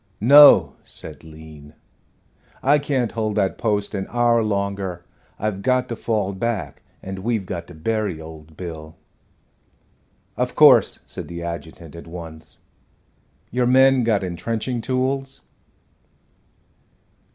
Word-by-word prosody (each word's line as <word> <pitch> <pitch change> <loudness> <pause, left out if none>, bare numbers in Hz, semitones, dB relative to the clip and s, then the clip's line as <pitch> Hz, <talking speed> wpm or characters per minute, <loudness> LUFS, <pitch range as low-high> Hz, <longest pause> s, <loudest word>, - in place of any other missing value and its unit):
"No," 145 +6 +7
said - - -9
Lean. 75 -1 -14 0.9
"I 145 +3 +4
can't 135 -5 -1
hold 110 -2 -2
that 95 -3 0
post 105 -3 -1
an 95 -2 -3
hour 120 -1 +2
longer. 100 -4 -3 0.3
I've 105 -2 -3
got 130 +2 +1
to 115 - -3
fall 105 -4 -2
back, 95 - -4 0.2
and 95 0 -6
we've 110 -1 -2
got 85 -2 -6
to - - -13
bury 100 +1 -2
old 80 -1 -12
Bill." 80 -3 -8 1.4
"Of - - -2
course," - - +6
said - - -8
the 85 0 -7
adjutant, 85 -1 -8
at 85 - -11
once. 80 -2 -10 0.9
"Your 125 +1 +1
men 130 0 +5
got 110 -4 +1
intrenching 115 +7 -3
tools?" 135 +2 -2
100 Hz, 120 wpm, -21 LUFS, 85-120 Hz, 1.4 s, No